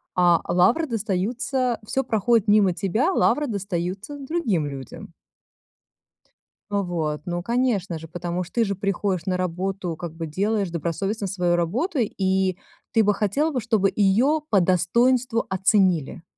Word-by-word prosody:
а 175 -2 +4
лавры 185 - +3
достаются 235 +4 -1
всё 270 +5 -1
проходит 225 -1 +1
мимо 205 -3 +4
тебя, 210 - 0
лавры 295 -4 +2
достаются 195 +4 -4
другим 265 - -1
людям. 135 -3 -9 1.6
Вот, 170 -7 -2
ну 175 0 -3
конечно 215 -8 0
же, 160 - -10
потому 175 +1 -3
ж 175 - -12
ты 235 - +1
же 200 - -1
приходишь 195 -2 -1
на 185 -1 +1
работу, 185 0 -3
как 170 -1 -7
бы 165 - -4
делаешь 195 +3 -1
добросовестно 190 +6 -2
свою 180 -2 0
работу, 250 - -1
и 190 -3 0 0.3
ты 225 - +4
бы 210 0 +3
хотела 245 +11 0
бы, 255 -4 -2
чтобы 210 -3 +1
её 230 +10 +3
по 200 - +4
достоинству 230 +7 +2
оценили. 185 -5 +1
195 Hz, 140 wpm, -23 LUFS, 175-230 Hz, 1.6 s, а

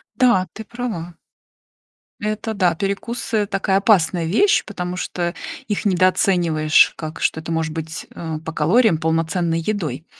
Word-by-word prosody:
Да, 195 -8 +3
ты 220 - -7
права. 210 -9 -5 1.1
Это, 215 +1 -2
да, 180 -5 +2
перекусы- 205 +4 -2
такая 195 -1 0
опасная 185 -5 +3
вещь, 230 - +3
потому 180 -3 -5
что 175 -1 -3 0.3
их 205 -1 -2
недооцениваешь, 175 -4 +3
как 155 0 -7
что 160 - 0
это 160 - -6
может 160 -1 -1
быть, 160 +1 -6
э, 160 -2 -4
по 160 - -4
калориям 180 +5 +3
полноценной 165 +1 0
едой. 160 - -3
180 Hz, 135 wpm, -21 LUFS, 160-205 Hz, 1.1 s, Да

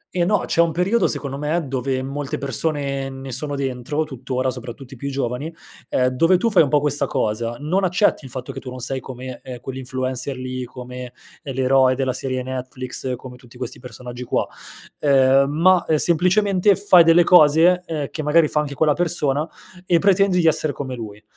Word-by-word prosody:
Eh 175 - +2
no, 205 +1 +1
c'è 170 - +2
un 165 -1 +2
periodo 185 +6 +1
secondo 140 -1 -3
me, 155 +2 -1
dove 130 0 -2
molte 140 +1 -4
persone 140 0 -2
ne 135 0 -8
sono 145 +3 -3
dentro 135 +3 -2
tuttora, 130 -2 -3
soprattutto 125 +1 -9
i - - -9
più 140 +3 -5
giovani, 135 +3 -3 0.4
ehm, 125 0 +2
dove 165 +8 +3
tu 230 +5 0
fai 195 - +6
un 145 - +2
po' 150 - +3
questa 145 -1 +1
cosa; 115 +1 -2
non 180 +7 0
accetti 180 -3 +2
il 130 - -9
fatto 125 0 -6
che - - -6
tu 130 - -9
non 130 - -8
sei 130 +2 -2
come, 130 -1 -8
ehm, 125 -2 -8
quell'influencer 130 +1 -4
lì, 130 0 -5
come, 125 0 -9 0.3
ehm, 135 -6 -7
l'eroe 130 0 +3
della 130 -1 -1
serie 130 -1 -3
Netflix, 130 0 -4
come 125 0 -11
tutti 125 -1 -17
questi 125 0 -5
personaggi 125 -1 -9
qua. - - 0 0.5
Ehm, 135 -1 +4
ma, 170 +4 +4
ehm, 155 - +3
semplicemente 185 +4 +3
fai 185 -3 +6
delle 165 +1 +5
cose, 175 +1 +5
ehm, 155 -5 -4
che 155 - -4
magari 155 +2 +3
fa 150 - 0
anche 145 -2 -3
quella 150 +1 +3
persona 155 -3 0 0.4
e 175 - +4
pretendi 195 0 +3
di 165 - +1
essere 155 -2 +2
come 130 -2 -5
lui. 105 -3 -8
135 Hz, 195 wpm, -21 LUFS, 130-160 Hz, 0.5 s, fai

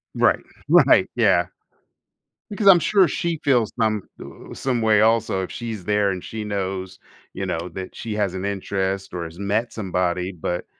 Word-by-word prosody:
Right, - - +2 0.2
right, - - +5
yeah. - - +3 1.0
Because 205 -1 -1
I'm 190 -3 +9
sure 190 +4 +4
she 170 -2 -2
feels 125 -6 +2
some 110 -2 +1 0.5
uh, - - -6
some 125 -3 -1
way 110 -1 +4
also 110 -3 +2
if 90 - -7
she's 110 -6 -6
there 105 0 +2
and 95 -2 -4
she 110 -1 -6
knows, 95 -2 -4 0.4
you - - -4
know, 85 +2 -3
that 95 -1 -7
she 110 -2 -5
has 100 -3 0
an 95 0 -5
interest 95 -1 -2
or 90 -1 -3
has 80 +1 -10
met 105 +4 -1
somebody, 90 -3 -2
but 90 0 -4
100 Hz, 170 wpm, -22 LUFS, 95-115 Hz, 1.0 s, I'm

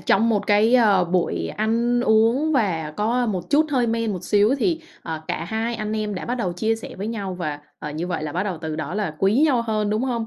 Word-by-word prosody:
trong 225 +4 +3
một 210 -3 0
cái, 210 +3 +4
ờ, 205 -7 +5
buổi 175 0 -1
ăn 235 +3 0
uống 235 +7 +3
và 180 - 0
có 240 +4 +1
một 185 -6 -3
chút 300 +2 +4
hơi 255 -4 +2
men 230 -1 0
một 185 - -6
xíu 210 +4 +3
thì, 330 +3 +1 0.2
ờ, 160 -1 -5
cả 165 - -2
hai 225 +5 -2
anh 215 -1 -3
em 210 -1 -2
đã 185 - -5
bắt 245 - -2
đầu 210 -8 -2
chia 220 +6 0
sẻ 225 - -9
với 200 - -4
nhau 205 -5 -4
và, 155 -5 -4 0.2
ờ, 150 - -6
như 155 +4 -4
vậy 175 -4 -3
là 150 -1 -4
bắt 180 - -1
đầu 190 -5 -3
từ 160 -1 -4
đó 155 +2 -4
là 205 -7 -2
quý 200 +7 +3
nhau 260 -6 +2
hơn, 215 -2 -1
đúng 215 +3 0
hông? 240 -3 -1
215 Hz, 250 wpm, -23 LUFS, 180-235 Hz, 0.2 s, ờ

